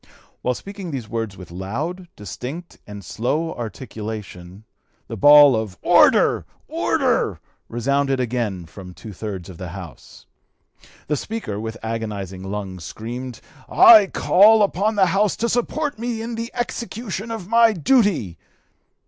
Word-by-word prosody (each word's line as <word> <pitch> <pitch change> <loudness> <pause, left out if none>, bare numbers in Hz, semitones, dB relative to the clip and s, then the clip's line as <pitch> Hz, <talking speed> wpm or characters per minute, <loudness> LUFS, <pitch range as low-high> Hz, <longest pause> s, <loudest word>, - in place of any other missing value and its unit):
While 125 0 0
speaking 195 - -8
these 130 -7 -5
words 115 -4 -4
with 90 -3 -11
loud, 140 - -5
distinct, 130 - -8
and 100 -2 -9
slow 150 - -2
(p. - - -5
259) 120 - -3
articulation, 105 -5 -8 0.4
the - - -6
bawl 145 -2 +8
of 110 -4 -4
'order! - - +4 0.2
order!' - - 0 0.3
resounded 135 +3 0
again 115 -7 -2
from 90 +2 -12
two 110 - -10
thirds 95 -3 -6
of 90 -4 -11
the 90 -2 -6
House. 90 -3 -11 0.8
The 150 - -1
Speaker, 150 - -5
with 110 +1 -5
agonizing 105 -5 -5
lungs, 95 -2 -6
screamed, 120 +7 -7 0.3
'I 215 -4 +8
call 210 +4 +5
upon 205 +2 0
the 195 -2 +4
House 195 +3 +1
to 235 - -1
support 245 +3 -1
me 230 -1 -3
in 235 +1 -5
the 230 +1 -4
execution 230 -3 -4
of 225 -6 -6
my 230 +1 +5
duty!' 180 - +1
125 Hz, 140 wpm, -21 LUFS, -, 0.8 s, bawl